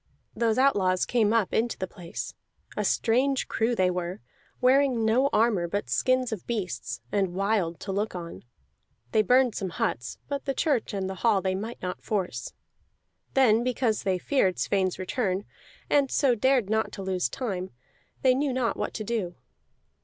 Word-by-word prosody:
Those 230 -1 +1
outlaws 195 -9 +3
came 220 -4 +2
up 225 -4 +1
into 235 +1 0
the 185 - -2
place; 180 -2 -7 0.4
a - - -1
strange 260 +4 +1
crew 230 +2 0
they 185 -3 +2
were, 180 +2 -3 0.4
wearing 255 -2 +3
no 250 +5 +3
armor 215 -6 +2
but 170 - -3
skins 255 - +2
of 210 -5 -5
beasts, 215 -6 -3
and 195 -3 0
wild 195 -5 0
to 195 - -4
look 205 +1 -2
on. 170 -1 -7 0.7
They 215 - +4
burned 250 +2 +4
some 190 - -3
huts, 180 - -2
but 280 -1 -4
the 275 -1 -1
church 285 -8 +1
and 190 -1 -2
the 190 - -3
hall 225 -4 +4
they 190 0 -1
might 215 +4 -5
not 180 0 -4
force. 185 - -3 0.8
Then, 235 -4 +5
because 245 -3 0
they 190 -2 0
feared 190 -3 +1
Sweyn's 190 -2 0
return, 190 0 -1 0.4
and 280 -2 +3
so 270 -2 +3
dared 250 -1 +2
not 220 +1 0
to 195 - -6
lose 185 -9 0
time, 190 - -3 0.5
they 260 -1 +6
knew 275 +1 0
not 250 -2 0
what - - -4
to 215 - -3
do. 205 -6 -2
215 Hz, 170 wpm, -27 LUFS, 185-250 Hz, 0.8 s, they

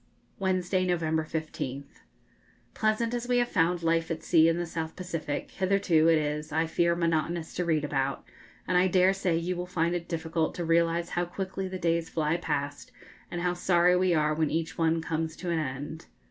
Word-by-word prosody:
Wednesday, 185 -1 +1
November 160 -3 0
15th. 140 - -5 0.7
Pleasant 220 +2 0
as 240 0 -3
we 245 0 +2
have 240 0 +2
found 170 0 +1
life 165 0 +1
at 160 -1 -4
sea 165 -2 +5
in 165 0 +2
the 175 - -1
South 160 -1 -5
Pacific 165 -5 -4
hitherto, 185 -4 +2
it 165 -1 +5
is, 150 0 -2
I 160 +2 +1
fear, 170 +1 +1
monotonous 165 0 -1
to 180 - -2
read 155 -3 +1
about, 135 -1 -1 0.4
and 180 -1 +3
I 185 - +4
dare 185 +1 +4
say 185 -4 0
you 175 +2 -2
will 180 0 -4
find 170 -1 0
it 175 -1 -3
difficult 160 -1 -2
to 175 - -3
realise 170 +1 +2
how 175 0 -1
quickly 190 +2 -4
the 185 0 -5
days 170 -2 0
fly 160 0 0
past, 145 -4 -3 0.4
and 175 - -4
how 175 0 +1
sorry 175 0 +3
we 185 0 +2
are 155 0 +2
when 155 -1 +1
each 165 +1 -2
one 165 0 +1
comes 160 -1 -2
to 175 -1 -4
an 165 - +1
end. 145 +2 -5
165 Hz, 195 wpm, -28 LUFS, 160-180 Hz, 0.7 s, sea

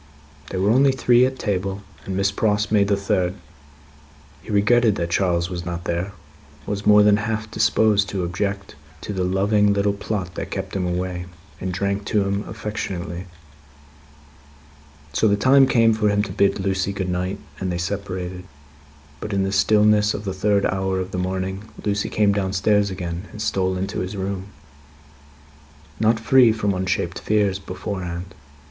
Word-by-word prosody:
They 95 - -4
were 100 +3 +2
only 135 +3 +5
three 125 -1 +4
at 130 0 -6
table, 100 -2 -2 0.2
and 95 -1 -3
Miss 100 0 +2
Pross 105 0 0
made 100 -2 +4
the 100 -1 +2
third. 95 -2 0 1.1
He - - -15
regretted 110 +1 +3
that 85 -1 -3
Charles 85 -2 +1
was 85 -1 -4
not 85 -1 -5
there; 85 +4 -2 0.5
was 100 0 -3
more 105 0 +7
than 105 0 +5
half 110 0 -3
disposed 110 -1 +2
to 95 -2 -2
object 100 +3 -3 0.3
to 105 - -5
the 95 -2 -1
loving 100 +3 +2
little 100 0 +1
plot 100 -3 -4
that - - -5
kept - - -5
him 90 -2 -1
away; 90 0 -3 0.3
and 95 - -3
drank 100 +2 -2
to 105 -1 +1
him 100 +1 -1
affectionately. 95 -4 -5 1.9
So, 110 - +3
the 100 -1 +3
time 135 +5 +5
came 115 -3 +4
for 110 -1 +1
him 105 0 +2
to 100 - -5
bid 100 +1 +2
Lucie 95 0 -1
good 95 -2 -3
night, 90 +2 -2 0.2
and 95 -1 -2
they 85 - -2
separated. 90 -1 -4 0.7
But, 105 - -5
in 100 -1 +1
the 95 - -1
stillness 105 +1 +3
of 105 - -6
the 95 - -2
third 100 +1 +1
hour 95 0 0
of 95 +1 -4
the 90 - -3
morning, 95 +2 -3 0.2
Lucie 100 -1 0
came 105 -2 +2
downstairs 100 +1 +1
again, 90 0 -5
and - - -10
stole 95 -4 0
into 95 +2 -3
his 95 +2 -4
room; 95 0 -3 1.5
not 110 +1 +3
free 120 +1 +5
from 105 -2 0
unshaped 95 -1 -2
fears, 100 -2 +1
beforehand. 90 -2 -5
100 Hz, 165 wpm, -22 LUFS, 95-105 Hz, 1.9 s, more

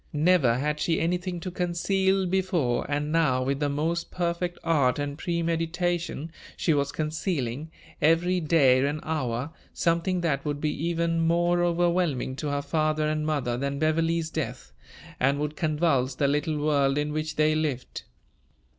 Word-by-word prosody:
Never 150 -6 +3
had 150 +3 -1
she 165 +1 +1
anything 175 +1 -1
to 185 - -5
conceal 190 +2 +1
before; 175 -10 0
and 145 +1 -1
now, 145 -6 +2
with 135 +1 -1
the 145 -1 0
most 165 +4 -1
perfect 175 0 -2
art 140 -6 +2
and 145 -1 -3
premeditation, 170 0 -2 0.3
she 165 - +2
was 140 -1 0
concealing, 155 - -2 0.3
every 170 +4 +3
day 140 -6 +4
and 145 +2 -1
hour, 130 -3 -2 0.2
something 170 +2 +1
that 145 -5 0
would 145 -1 -2
be 150 0 -1
even 170 0 0
more 175 +1 +2
overwhelming 170 -6 +1
to 150 - -3
her 145 0 -1
father 155 +1 0
and 155 0 -1
mother 135 -6 -1
than 140 +2 -2
Beverley's 160 +1 +1
death, - - -4 0.5
and 135 +2 +2
would 150 +1 -3
convulse 150 -5 +1
the 140 - +1
little 150 +2 0
world 145 -2 +2
in 150 0 -1
which 155 0 -3
they 155 0 +3
lived. 150 -5 -3
155 Hz, 155 wpm, -26 LUFS, 145-170 Hz, 0.5 s, day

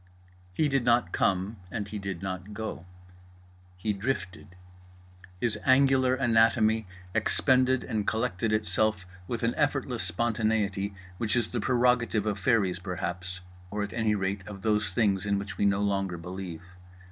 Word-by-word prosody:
He 150 +11 +1
did 135 -3 +1
not 120 -7 +3
come 95 +4 0
and 105 +1 -4
he 105 0 -5
did 95 -3 -5
not 95 +2 -5
go. 110 -5 -5 0.9
He 105 +3 -1
drifted. 100 -5 -4 0.8
His 105 -1 0
angular 130 -1 +4
anatomy 110 -3 +3 0.3
expended 130 +3 +2
and 105 -2 -2
collected 110 -2 0
itself 110 -2 +1 0.2
with 120 -2 -3
an 115 +1 +2
effortless 135 -5 0
spontaneity 105 0 0 0.2
which 110 -1 0
is 120 -3 0
the 120 - -1
prerogative 120 -2 +2
of 105 -1 -1
fairies 95 -4 +2
perhaps, 90 0 -4 0.3
or 105 +1 -2
at 105 - -5
any 110 -2 +1
rate 95 0 -1
of 100 -2 -9
those 105 -3 +1
things 95 -1 +2
in 100 -1 +2
which 100 +1 -6
we - - +3
no 100 0 +2
longer 100 -3 0
believe. 90 -1 -7
105 Hz, 145 wpm, -28 LUFS, 95-115 Hz, 0.9 s, angular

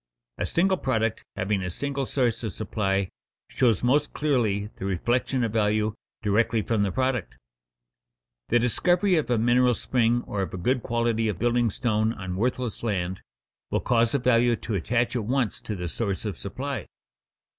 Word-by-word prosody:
_ - - 0
A - - -1
single 190 +2 +2
product 115 -7 0
having 100 0 0
a 90 - -3
single 140 +7 -3
source 125 -5 0
of 110 -5 -4
supply 100 -3 -1 0.4
shows 120 -6 +2
most 145 +4 +2
clearly 110 -8 0
the - - -5
reflection 120 +7 0
of 115 -2 -1
value 105 -1 +1 0.3
directly 110 +1 +2
from 110 -1 0
the 100 -1 +1
product. 120 - -1 1.1
The 120 - +4
discovery 175 - +2
of 155 - -1
a 120 - +3
mineral 120 +2 +4
spring 120 0 +1
or 100 - -3
of 95 - -3
a - - -4
good 125 +8 +1
quality 115 -1 0
of 105 -5 -1
building 120 +2 +2
stone 110 0 0
on 95 -4 -5
worthless 125 +2 -1
land, 95 -5 -2 0.5
will - - 0
cause 115 +1 +2
a - - +5
value 120 -1 +3
to 115 - -5
attach 115 +7 0
at 120 - 0
once 125 -2 0
to 105 - -4
the 90 -2 -4
source 100 +3 -2
of 105 - -2
supply. 135 +7 -5
115 Hz, 175 wpm, -26 LUFS, 105-125 Hz, 1.1 s, a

